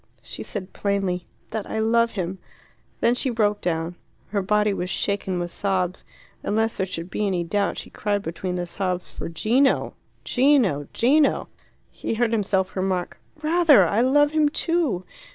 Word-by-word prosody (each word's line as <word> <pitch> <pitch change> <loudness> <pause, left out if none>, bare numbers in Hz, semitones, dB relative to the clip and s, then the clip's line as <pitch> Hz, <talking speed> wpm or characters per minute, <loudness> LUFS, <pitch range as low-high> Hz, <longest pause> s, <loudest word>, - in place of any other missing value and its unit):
She - - -7
said 195 -4 -6
plainly, 195 -3 -1 0.2
"That 220 -2 -4
I - - -3
love 230 +1 +2
him." 185 -1 -3 0.6
Then 235 - +4
she 255 +2 0
broke 210 -3 +1
down. 170 0 -2 0.3
Her 200 -1 0
body 210 +1 +2
was 180 -1 -3
shaken 195 -1 -1
with 175 0 -3
sobs, 185 -2 -1 0.4
and 205 - -1
lest 225 +1 +1
there 190 - 0
should 180 0 -6
be 210 - 0
any 180 -3 0
doubt 200 +4 0
she - - -7
cried 205 -1 -1
between 180 +2 -4
the 175 -1 -2
sobs 180 0 -3
for - - -5
Gino! 235 - +2 0.3
Gino! 245 - +3
Gino! 285 +5 +3 0.4
He - - -3
heard 235 0 +1
himself 195 -4 0
remark 185 -2 -2 0.2
"Rather! 310 - +6
I 205 +7 +2
love 290 +3 +4
him 310 -1 +3
too! 310 - 0
205 Hz, 165 wpm, -24 LUFS, 180-235 Hz, 0.6 s, Rather